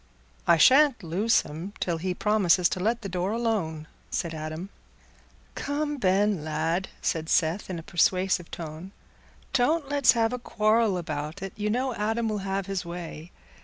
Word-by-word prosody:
"I 170 - +6
shan't 265 - +5
loose 190 +8 +2
him 165 +7 -8
till 170 -2 -1
he 180 +1 -2
promises 190 -4 +3
to - - -3
let 225 +5 0
the - - -3
door 185 +2 -2
alone," 205 -10 -1 0.2
said 170 -1 -2
Adam. 155 +4 -5 0.8
"Come, 295 +1 -2
Ben, 195 - +2
lad," 165 +4 -1 0.2
said 160 -1 -1
Seth, 170 +4 +1
in 185 - -3
a 165 - -7
persuasive 180 +1 +1
tone, 165 +4 -8 0.6
"don't 280 +3 +2
let's 285 -2 +5
have 230 0 +1
a 250 - -3
quarrel 215 -3 +2
about 155 +1 -5
it. 195 - -5
You 210 0 -2
know 255 +3 0
Adam 225 +2 -1
will 210 -1 -2
have 195 0 -2
his 195 -1 -3
way. 170 -1 -7
190 Hz, 165 wpm, -27 LUFS, 170-225 Hz, 0.8 s, I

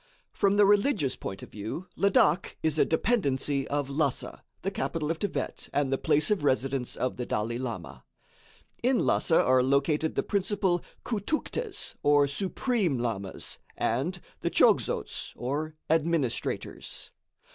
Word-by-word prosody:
From 200 0 +2
the 205 - +7
religious 205 - +3
point 95 - -6
of - - -11
view 110 - -5
Ladak 195 -2 +3
is 155 -1 +1
a - - +6
dependency 145 - +1
of 145 -1 -1
Lhassa, 140 -1 -1 0.2
the 195 - -1
capital 165 -5 -2
of 165 - -3
Thibet 205 - -3
and 140 -2 +1
the 135 - 0
place 150 +8 +2
of 205 -8 +1
residence 130 -2 0
of 130 - -2
the 125 - -3
Dalai 115 +3 -1
Lama. 115 -11 -6 0.8
In 250 +1 +2
Lhassa 165 - +3
are 130 0 +4
located 140 +4 +1
the - - +1
principal 195 -3 0 0.2
Khoutoukhtes, 310 - -2
or 145 -1 +5
Supreme 190 - 0
Lamas, 110 -6 -3 0.2
and - - 0 0.2
the - - -1
Chogzots, - - +2
or 150 +5 -3
administrators. 160 -5 -1
150 Hz, 135 wpm, -28 LUFS, 130-195 Hz, 0.8 s, the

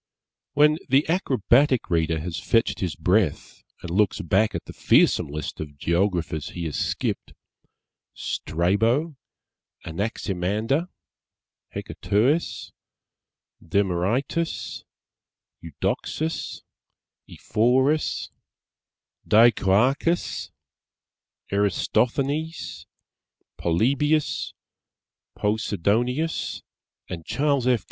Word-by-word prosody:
When 150 +2 +4
the 135 +3 +4
acrobatic 135 - +2
reader 80 -1 +1
has 85 -1 -4
fetched 115 +8 +1
his 90 -3 -2
breath 90 -1 0 0.2
and 90 - -5
looks 100 +1 +2
back 95 +6 +1
at - - -4
the - - -9
fearsome - - +3
list 75 +1 -5
of 75 -2 -7
Geographers 85 -2 0
he 85 -1 -5
has 75 - -3
skipped - - -2 0.8
Strabo, 115 - 0 0.7
Anaximander, 105 - -1 0.9
Hecatœus, 130 +11 0 0.9
Demœritus, 100 - -1 0.8
Eudoxus, 115 - -3 0.7
Ephorus, 130 +7 +1 1.0
Dicœarchus, 120 - +3 1.0
Erastothenes, 135 - 0 0.7
Polybius, 140 - +1 0.8
Posidonius 110 - 0 0.4
and 85 -2 -6
Charles 140 - 0
F. 125 -2 +4
110 Hz, 70 wpm, -24 LUFS, 90-140 Hz, 1.0 s, When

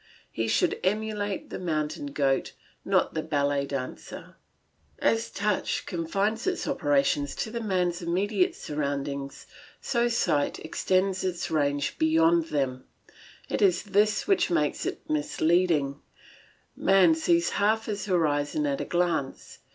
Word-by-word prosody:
He 115 0 -2
should - - +1
emulate 205 0 -2
the - - -5
mountain 155 -4 -2
goat, 140 -1 0 0.3
not - - +1
the 160 - -1
ballet 145 -2 0
dancer. 135 -2 -6 0.6
As 225 0 +1
touch 205 -1 -1
confines 195 - -1
its 370 -2 -1
operations 145 - +1
to 220 - -3
the 235 0 -4
man's 180 -4 0
immediate 205 - 0
surroundings, 140 -1 -4 0.3
so 240 -2 0
sight 175 -11 +1
extends 185 +3 0
its 180 -3 -2
range 145 -2 0
beyond 165 +1 +4
them; 135 -4 -2 0.6
it - - -2
is 185 -3 +3
this 210 +1 +2
which 390 -2 +3
makes 150 -4 0
it - - -6
misleading; 155 -1 +1 0.7
man 190 -4 +5
sees 170 +1 +2
half 220 +2 +1
his 205 -1 -4
horizon 165 - +1
at 280 -1 -1
a - - -3
glance. 175 -6 -2
170 Hz, 130 wpm, -27 LUFS, 145-205 Hz, 0.7 s, man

